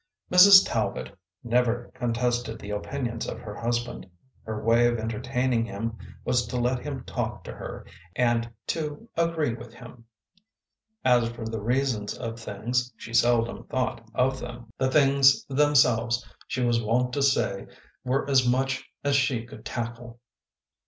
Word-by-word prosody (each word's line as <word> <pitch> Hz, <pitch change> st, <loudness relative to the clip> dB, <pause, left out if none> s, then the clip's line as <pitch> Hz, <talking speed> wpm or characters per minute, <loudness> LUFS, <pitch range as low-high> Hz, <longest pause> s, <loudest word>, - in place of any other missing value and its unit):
Mrs. 190 Hz, +2 st, +9 dB
Talbot 110 Hz, -3 st, -2 dB, 0.3 s
never 120 Hz, 0 st, 0 dB
contested 120 Hz, -2 st, -1 dB
the 105 Hz, -1 st, -8 dB
opinions 115 Hz, +2 st, -3 dB
of -, -, -5 dB
her 105 Hz, -3 st, -8 dB
hus 120 Hz, +1 st, 0 dB
band. 120 Hz, -5 st, -9 dB, 0.3 s
Her 110 Hz, -1 st, -5 dB
way 115 Hz, +1 st, +4 dB
of 120 Hz, 0 st, 0 dB
entertaining 120 Hz, +2 st, -1 dB
him 115 Hz, +1 st, -4 dB, 0.3 s
was 120 Hz, -3 st, +1 dB
to 125 Hz, -, -3 dB
let 125 Hz, +1 st, +1 dB
him 135 Hz, -2 st, -6 dB
talk -, -, -4 dB
to -, -, -7 dB
her -, -, -8 dB, 0.3 s
and 120 Hz, -1 st, +1 dB, 0.2 s
to 155 Hz, +7 st, -4 dB
agree 165 Hz, -6 st, +1 dB
with 120 Hz, 0 st, -10 dB
him. 120 Hz, -1 st, -13 dB, 1.0 s
As 120 Hz, -2 st, +4 dB
for 120 Hz, -1 st, -7 dB
the 110 Hz, -1 st, -4 dB
reasons 120 Hz, -2 st, -1 dB
of 115 Hz, -1 st, -5 dB
things, 120 Hz, +4 st, -2 dB
she 115 Hz, -, -10 dB
seldom 115 Hz, 0 st, +2 dB
thought 130 Hz, -2 st, -2 dB
of 130 Hz, +1 st, +1 dB
them. 120 Hz, -2 st, -9 dB
The 130 Hz, -, +2 dB
things 140 Hz, -1 st, +5 dB
them 145 Hz, +2 st, +2 dB
selves 120 Hz, -2 st, +3 dB, 0.2 s
she 125 Hz, -, -2 dB
was 120 Hz, -1 st, +2 dB
wont 125 Hz, +3 st, 0 dB
to 140 Hz, -, 0 dB
say 130 Hz, -7 st, +1 dB, 0.4 s
were 130 Hz, +2 st, 0 dB
as 130 Hz, -3 st, +3 dB
much 130 Hz, +1 st, 0 dB
as 140 Hz, 0 st, +2 dB
she 130 Hz, -4 st, +1 dB
could 125 Hz, -, -12 dB
tackle. 120 Hz, 0 st, -6 dB
120 Hz, 155 wpm, -26 LUFS, 115-130 Hz, 1.0 s, Mrs